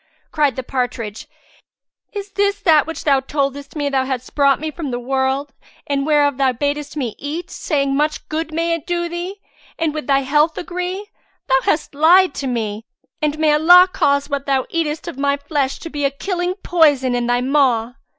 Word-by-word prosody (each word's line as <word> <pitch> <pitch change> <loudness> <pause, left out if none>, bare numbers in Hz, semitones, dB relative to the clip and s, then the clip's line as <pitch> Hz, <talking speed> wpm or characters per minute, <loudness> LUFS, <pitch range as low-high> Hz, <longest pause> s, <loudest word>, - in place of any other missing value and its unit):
Cried 295 -4 +1
the 260 - -4
partridge, 240 -4 -4 0.8
"Is 405 -1 -6
this 405 0 0
that 315 -6 +4
which 325 - -6
thou 275 -3 +4
toldest 275 +1 -3
me 290 -2 -1
thou 270 -2 +1
hadst 260 -2 -4
brought 280 -2 +3
me 310 +1 -4
from 305 -2 -5
the 245 -1 -3
wold, 265 +2 -1 0.3
and 280 0 -1
whereof 290 -3 +3
thou 270 -1 +3
badest 290 +3 -3
me 245 -7 -2
eat, 305 +5 -5
saying, 275 -3 -1
'Much 300 +2 -1
good 320 +1 -3
may 335 +1 0
it 335 -3 -4
do 345 -1 -1
thee, 345 +3 -5 0.4
and 325 -2 0
with 305 -4 -5
thy 275 -1 +3
health 295 +4 +2
agree?' 360 +4 -4 0.4
Thou 265 -1 +4
hast 305 - 0
lied 350 +6 +5
to 275 - -4
me, 220 -3 -3 0.3
and 300 0 0
may 310 -1 +3
Allah 355 +4 +7
cause 280 -5 +2
what 280 -1 -3
thou 270 -1 +1
eatest 320 -2 -2
of 270 - -6
my 280 0 +1
flesh 280 -1 -2
to 330 - -8
be 290 -1 -3
a 275 - +3
killing 355 +5 -3
poison 290 -7 +3
in 240 -1 -1
thy 245 0 +1
maw!" 255 -4 +2
290 Hz, 190 wpm, -19 LUFS, 270-325 Hz, 0.8 s, Allah